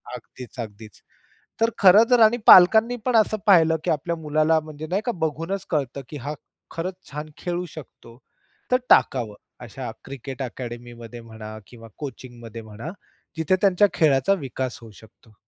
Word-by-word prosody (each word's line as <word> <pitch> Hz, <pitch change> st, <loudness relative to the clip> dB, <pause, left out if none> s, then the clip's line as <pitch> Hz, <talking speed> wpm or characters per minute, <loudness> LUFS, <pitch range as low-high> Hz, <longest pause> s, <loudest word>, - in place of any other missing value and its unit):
अगदीच, 125 Hz, +1 st, -12 dB
अगदीच. 110 Hz, -1 st, -9 dB, 0.6 s
तर 225 Hz, -, +4 dB
खरंतर 220 Hz, +6 st, +6 dB
आणि 235 Hz, +3 st, +2 dB
पालकांनी 220 Hz, +7 st, +8 dB
पण 250 Hz, -2 st, +1 dB
असं 215 Hz, 0 st, +2 dB
पाहिलं, 165 Hz, -4 st, +5 dB
की -, -, 0 dB
आपल्या 170 Hz, +3 st, -2 dB
मुलाला 155 Hz, +1 st, +1 dB
म्हणजे 155 Hz, 0 st, -9 dB
नाही 195 Hz, +5 st, -1 dB
का, 245 Hz, -, 0 dB
बघूनच 165 Hz, +4 st, -3 dB
कळतं 140 Hz, -3 st, -2 dB
की 150 Hz, -, -7 dB
हा 145 Hz, +3 st, -5 dB, 0.4 s
खरंच 180 Hz, +3 st, -4 dB, 0.2 s
छान 150 Hz, +2 st, -6 dB
खेळू 175 Hz, 0 st, -3 dB
शकतो. 120 Hz, -6 st, -13 dB, 0.5 s
तर 250 Hz, -, +5 dB
टाकावं 115 Hz, -6 st, +3 dB, 0.3 s
अशा -, -, -7 dB
क्रिकेट 135 Hz, 0 st, -8 dB
अकॅडमीमध्ये 120 Hz, -1 st, -8 dB
म्हणा 110 Hz, -1 st, -10 dB
किंवा 115 Hz, -2 st, -13 dB
कोचिंगमध्ये 120 Hz, -5 st, -9 dB
म्हणा, 110 Hz, +6 st, -9 dB, 0.5 s
जिथे 160 Hz, +3 st, +2 dB
त्यांच्या 200 Hz, 0 st, +4 dB
खेळाचा 145 Hz, +3 st, +3 dB
विकास 130 Hz, -1 st, -4 dB
होऊ 115 Hz, -, -12 dB
शकतो. 110 Hz, 0 st, -21 dB
150 Hz, 145 wpm, -23 LUFS, 120-175 Hz, 0.6 s, पालकांनी